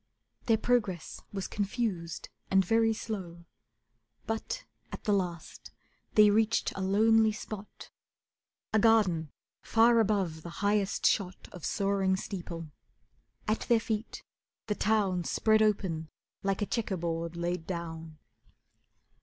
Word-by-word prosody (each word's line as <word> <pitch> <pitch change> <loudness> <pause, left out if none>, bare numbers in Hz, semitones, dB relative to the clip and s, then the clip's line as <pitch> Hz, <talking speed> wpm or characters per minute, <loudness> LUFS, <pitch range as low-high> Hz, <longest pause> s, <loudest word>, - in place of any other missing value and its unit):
Their 225 -2 +5
progress 215 -7 0
was 195 -2 -3
confused 200 -5 -3 0.2
and 190 -1 +4
very 225 +3 +3
slow, 185 -6 -5 0.8
But 225 - -3 0.3
at - - -7
the 210 - +2
last 175 -4 -3 0.5
they 210 -1 +7
reached 220 +2 +2
a 195 - -4
lonely 220 +3 +4
spot, 210 -1 -8 0.8
A 220 - +5
garden 195 -9 +3 0.3
far 230 +1 +4
above 195 -7 +1
the 170 +1 -9
highest 205 -1 +1
shot 185 -2 +1
Of 180 - -8
soaring 195 -1 +1
steeple. 170 -5 -6 0.8
At 215 +1 +1
their 235 -1 +5
feet, 220 0 -4 0.4
the 210 - 0
town 205 -4 +1
Spread 220 +5 +3
open 185 -7 +1 0.3
like 195 +1 0
a - - +1
chequer 210 -3 -2
board 165 0 -3
laid 170 -1 -2
down. 165 -3 -5
200 Hz, 120 wpm, -30 LUFS, 175-220 Hz, 0.8 s, they